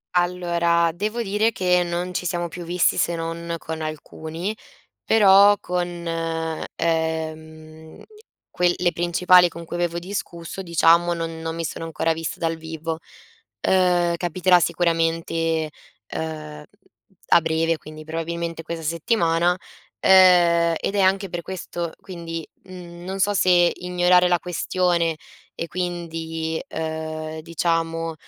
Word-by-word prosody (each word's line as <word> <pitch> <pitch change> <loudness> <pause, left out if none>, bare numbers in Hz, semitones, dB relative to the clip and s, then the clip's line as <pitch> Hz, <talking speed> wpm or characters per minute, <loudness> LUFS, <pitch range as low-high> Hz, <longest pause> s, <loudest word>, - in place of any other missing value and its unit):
Allora, 170 -1 +2
devo 215 +6 -2
dire 210 +1 +1
che 180 -3 +2
non 175 +1 -3
ci 180 - -3
siamo 175 0 -1
più 175 +1 -8
visti 175 +1 +2
se 170 - +1
non 165 +1 -4
con 160 0 -6
alcuni, 160 +5 -5 0.5
però 205 -1 +6
con, 175 -2 -3 0.7
ehm, 160 -1 -3 0.5
que 175 0 +2
le 175 -1 +1
principali 175 +1 +4
con 170 0 -9
cui 170 - -6
avevo 175 -1 -1
discusso, 175 -1 -6
diciamo, 170 0 +4
non 165 -1 -5
non 165 0 -4
mi 165 0 -4
sono 165 - -4
ancora 165 0 0
vista 165 0 -5
dal 165 -1 -1
vivo. 160 0 -5 0.7
Uhm, 175 -2 +3
capiterà 180 +1 +3
sicuramente, 165 -1 0 0.4
uhm, 155 -1 -5 0.7
a - - +7
breve 165 0 0
quindi 155 0 -11
probabilmente 165 +1 -4
questa 170 0 -6
settimana, 170 +1 +1 0.4
ehm, 175 -3 +6
ed 195 - -3
è 200 - +2
anche 195 +1 +2
per 175 - -3
questo 175 -2 -5
quindi, 165 -3 -7 0.2
mhmm, 175 -2 -11
non 190 +1 -4
so 205 +2 +3
se 175 -2 +4
ignorare 180 0 +3
la 175 -1 +3
questione 175 0 0 0.4
e 170 - -4
quindi, 165 -2 -3 0.2
uhm, 160 0 -4
diciamo, 165 0 -1
170 Hz, 125 wpm, -23 LUFS, 165-180 Hz, 0.7 s, a